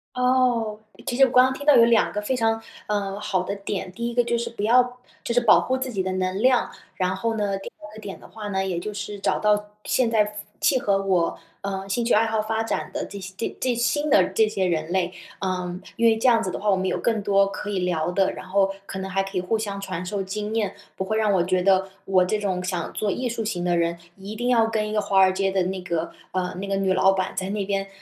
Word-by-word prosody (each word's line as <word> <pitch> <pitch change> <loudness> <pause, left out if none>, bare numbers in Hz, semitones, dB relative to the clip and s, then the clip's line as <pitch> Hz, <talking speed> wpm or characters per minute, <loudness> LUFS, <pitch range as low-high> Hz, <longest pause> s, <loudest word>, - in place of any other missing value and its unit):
哦， 250 -4 +2 0.3
其 245 - -2
实 270 - +5
我 255 - -2
刚 250 0 +7
刚 260 - 0
听 285 +2 -8
到 295 - +7
有 230 - +7
2 230 -2 +3
个 210 - -2
非 235 +5 -1
常， 225 -2 +1 0.3
呃， 200 -1 -2
好 190 -3 -1
的 200 +2 -3
点， 195 -2 -4
第 235 +5 -3
1 - - -6
个 245 0 +3
就 235 0 0
是 235 - -3
不 230 -3 -6
要 245 +2 +3 0.2
就 235 - -2
是 245 - +5
保 235 - +6
护 260 +1 0
自 260 -1 -3
己 195 -5 -1
的 190 - -2
能 185 +1 -1
量， 255 0 +3 0.3
然 185 0 0
后 225 +4 -1
呢， 200 -2 0
第 195 - -8
2 210 +1 -11
个 215 - -10
点 200 -2 -7
的 - - -14
话 215 -2 -8
呢， 190 -1 -1
也 180 -3 -2
就 210 +4 -5
是 205 0 -5
找 - - 0
到 210 0 +2 0.2
现 250 -3 +2
在 220 -2 +3
符 210 - -7 0.3
契 - - +3
合 200 -4 +2
我， 185 -4 +1 0.2
呃， 195 -1 -4
兴 215 +5 0
趣 235 - +2
爱 220 +2 +4
好 220 -1 0
发 220 +1 -1
展 225 - -3
的 - - -3
这 200 - -8
些 190 0 -8
这 230 - -3
这 255 -1 +1
新 290 +5 0
的 200 -9 +6
这 215 +3 +3
些 195 -3 -1
人 165 -2 -1
类， 180 -1 0 0.3
呃， 180 -2 -3 0.2
因 235 - +1
为 225 -1 +4
这 225 - +1
样 230 -2 +5
子 185 - -2
的 - - -4
话， 210 - 0
我 - - +4
们 190 0 -1
有 - - 0
更 225 -3 0
多 200 0 +3
可 205 +1 -6
以 200 -2 -1
聊 175 -2 0
的， 190 +1 +1
然 - - -9
后 195 +1 +2 0.2
可 - - -6
能 190 0 -4
还 195 +1 +1
可 195 0 -5
以 - - +1
互 220 +5 0
相 200 -2 -4
传 185 -3 -4
授 195 +2 -3
经 210 +3 -4
验， 205 -3 -1 0.2
不 190 - -2
会 220 +3 -1
让 215 -1 +2
我 185 -3 +3
觉 185 +1 +1
得 190 0 +3 0.2
我 185 -1 +3
这 215 +4 0
种 190 -3 -1
想 180 -1 -3
做 210 -2 -1
艺 250 +3 -2
术 230 -1 -3
型 180 -4 -2
的 175 -1 +1
人， 170 0 0 0.2
一 200 +2 -8
定 240 +3 -1
要 230 -2 +4
跟 215 -1 -1
一 - - -5
个 215 - +1
华 200 -1 +2
尔 190 0 +6
街 195 +1 0
的 190 0 +1
那 185 +1 -2
个， 170 -2 -2 0.2
呃， 185 -1 -2
那 195 +2 -5
个 195 - 0
女 195 -1 +1
老 190 +1 +4
板 190 0 -2
在 185 - -1
那 205 -1 -1
边， 195 0 -1
200 Hz, 290 characters per minute, -24 LUFS, 190-225 Hz, 0.3 s, 刚